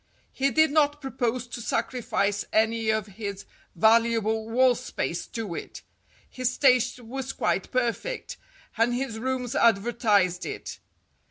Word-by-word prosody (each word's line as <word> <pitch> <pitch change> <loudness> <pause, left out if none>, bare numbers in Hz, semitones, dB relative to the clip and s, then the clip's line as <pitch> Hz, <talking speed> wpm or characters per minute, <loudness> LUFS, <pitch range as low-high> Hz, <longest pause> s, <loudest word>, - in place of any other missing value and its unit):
He 275 +1 +1
did 315 0 +3
not 295 -1 +2
propose 255 -3 -2
to 240 0 -7
sacrifice 215 -4 -1
any 220 0 +2
of 220 -2 +1
his 200 -1 -7 0.3
valuable 220 +2 +3
wall 255 +2 +4
space 175 -6 -4
to 220 -6 -5
it. - - -7 0.4
His 255 0 -2
taste 255 -2 +3
was 265 +3 -5
quite 190 - -1
perfect, 255 - -2 0.4
and 240 +1 +3
his 245 -3 -3
rooms 255 0 -2
advertised 205 -5 +2
it. - - -6
230 Hz, 125 wpm, -26 LUFS, 220-255 Hz, 0.4 s, wall